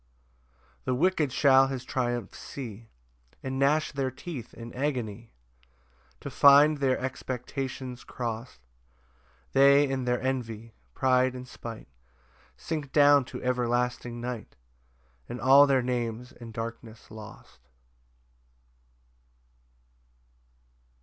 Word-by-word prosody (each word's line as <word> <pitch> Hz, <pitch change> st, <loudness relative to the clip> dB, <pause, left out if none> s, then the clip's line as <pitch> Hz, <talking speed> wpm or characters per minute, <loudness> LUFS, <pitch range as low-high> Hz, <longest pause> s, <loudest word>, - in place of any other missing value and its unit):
6 -, -, -37 dB, 0.2 s
The 130 Hz, -, 0 dB
wicked 155 Hz, -1 st, +1 dB
shall 135 Hz, -1 st, +5 dB
his 135 Hz, -2 st, -4 dB
triumph 120 Hz, -5 st, -2 dB
see, 115 Hz, -4 st, -8 dB, 0.5 s
And 130 Hz, 0 st, -3 dB
gnash 150 Hz, +3 st, +2 dB
their 135 Hz, -2 st, -1 dB
teeth 130 Hz, -1 st, -8 dB
in 115 Hz, 0 st, -9 dB
agony 120 Hz, -5 st, -3 dB, 0.9 s
To -, -, -6 dB
find 145 Hz, +2 st, +6 dB
their 135 Hz, -2 st, +2 dB
expectations 130 Hz, 0 st, -5 dB
crost: 115 Hz, -, -5 dB, 1.0 s
They 140 Hz, +1 st, +6 dB
and 130 Hz, -2 st, -2 dB
their 125 Hz, 0 st, +1 dB
envy, 115 Hz, -4 st, -4 dB, 0.2 s
pride 130 Hz, 0 st, +2 dB
and 125 Hz, 0 st, -8 dB
spite, 115 Hz, -2 st, -9 dB, 0.7 s
Sink 150 Hz, -, -4 dB
down 145 Hz, -2 st, +6 dB
to -, -, -8 dB
everlasting 125 Hz, -1 st, -1 dB
night, 120 Hz, -2 st, -6 dB, 0.7 s
And 120 Hz, -, -5 dB
all 135 Hz, +3 st, +7 dB
their 135 Hz, -2 st, +2 dB
names 120 Hz, 0 st, -3 dB
in 115 Hz, -1 st, -11 dB
darkness 115 Hz, 0 st, -8 dB
lost. 105 Hz, -, -13 dB
125 Hz, 105 wpm, -28 LUFS, 120-135 Hz, 1.0 s, all